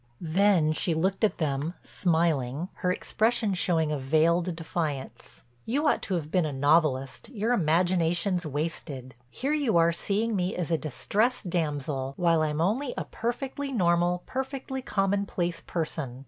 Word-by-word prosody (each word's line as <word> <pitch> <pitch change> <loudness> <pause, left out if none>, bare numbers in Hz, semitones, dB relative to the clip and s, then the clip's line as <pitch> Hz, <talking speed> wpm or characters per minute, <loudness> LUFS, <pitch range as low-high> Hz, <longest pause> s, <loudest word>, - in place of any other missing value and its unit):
Then 185 -5 +4
she 165 +1 0
looked 190 +6 0
at 215 - +2
them, 150 +2 -1
smiling, 160 -3 0
her 180 - 0
expression 220 +2 +1
showing 165 -4 +1
a 150 - -1
veiled 165 +5 +2
defiance, 160 -4 -5 0.2
"You 285 +7 0
ought - - +2
to 190 - -2
have 155 -3 -4
been 180 0 +3
a 155 - -2
novelist—your 150 - +1
imagination's 175 0 +2
wasted. 145 -4 -4 0.2
Here 275 - -2
you 280 - +2
are 165 0 +5
seeing 210 +6 0
me 180 -1 -1
as 170 -2 -3
a - - +4
distressed 200 - 0
damsel, 145 -5 -2
while 170 -2 +3
I'm 155 0 0
only 240 +10 0
a - - -2
perfectly 270 +4 -3
normal, 175 -4 +2
perfectly 265 0 -4
common 200 -3 0
place 175 -3 -2
person. 155 -6 -3
170 Hz, 145 wpm, -27 LUFS, 155-200 Hz, 0.2 s, are